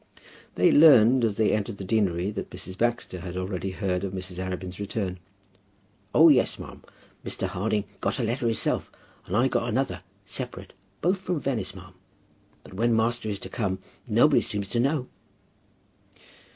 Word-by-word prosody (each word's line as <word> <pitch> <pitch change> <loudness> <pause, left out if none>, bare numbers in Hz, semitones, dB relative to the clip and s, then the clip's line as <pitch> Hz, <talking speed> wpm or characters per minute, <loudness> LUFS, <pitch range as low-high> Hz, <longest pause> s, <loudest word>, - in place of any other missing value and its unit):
They - - +4
learned 130 -5 +7
as 110 -3 +1
they 110 - +3
entered 105 0 -1
the 100 - -6
deanery 95 -2 0
that 105 - -5
Mrs. 95 +2 -7
Baxter 120 -4 -1
had 90 0 -6
already 95 0 -3
heard 95 -1 -2
of 95 -1 -3
Mrs. 90 -1 -5
Arabin's 95 0 -5
return. 100 -3 -3 1.0
"O - - +8
yes, - - +4
ma'am. - - -10 0.4
Mr. - - -3
Harding 105 +2 -1 0.2
got - - -1
a 125 - -1
letter 120 +2 -1
hisself, 115 - 0 0.4
and 95 - 0
I 125 +3 +4
got 120 -2 0
another, 110 -7 -1 0.2
separate; 100 -4 -5 0.3
both 185 +3 +2
from 180 -3 -2
Venice, 120 -9 -2
ma'am. 90 0 -12 0.7
But - - -14
when 115 +4 +2
master 115 0 0
is 100 - -2
to - - -6
come, 100 -6 -2 0.3
nobody - - +4
seems 100 -1 -2
to 120 - 0
know." 135 +1 +1
105 Hz, 165 wpm, -26 LUFS, 95-120 Hz, 1.0 s, O